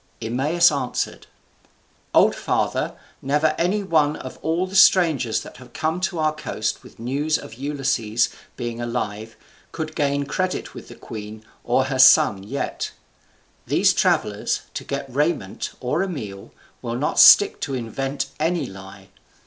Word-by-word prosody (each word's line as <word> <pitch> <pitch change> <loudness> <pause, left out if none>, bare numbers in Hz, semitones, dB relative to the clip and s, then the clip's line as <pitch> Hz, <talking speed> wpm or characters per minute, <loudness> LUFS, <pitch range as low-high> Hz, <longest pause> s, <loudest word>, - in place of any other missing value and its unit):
Eumaeus 145 +10 +2
answered, 135 -4 -3 0.8
"Old - - +5
father, - - -1 0.3
never 150 +3 +1
any 195 +5 +1
one 155 -5 +2
of - - -9
all 165 +3 0
the 190 +1 -9
strangers 165 - +4
that - - -12
have 125 -1 -15
come 160 +3 -2
to 185 -1 -1
our 155 -1 +1
coast 130 -7 -3
with - - -16
news 140 +7 -1
of - - -10
Ulysses 130 -4 0 0.3
being 120 0 -4
alive 110 -2 -4 0.4
could 155 -1 -5
gain 140 -1 0
credit 185 +5 -3
with - - -10
the - - -11
queen 110 0 -9 0.2
or 125 +2 +2
her 130 0 -3
son 110 -6 +6
yet. 115 +8 -4 0.7
These - - +3
travellers, - - 0
to - - -5
get 140 0 -4
raiment 140 - -1
or 140 +7 -1
a 195 - -1
meal, 105 - -7 0.3
will 115 -1 -4
not 140 +5 -1
stick 205 - +8
to 135 - -2
invent 135 +3 -3
any 165 -1 0
lie. 95 -1 -12
140 Hz, 150 wpm, -22 LUFS, 115-155 Hz, 0.8 s, stick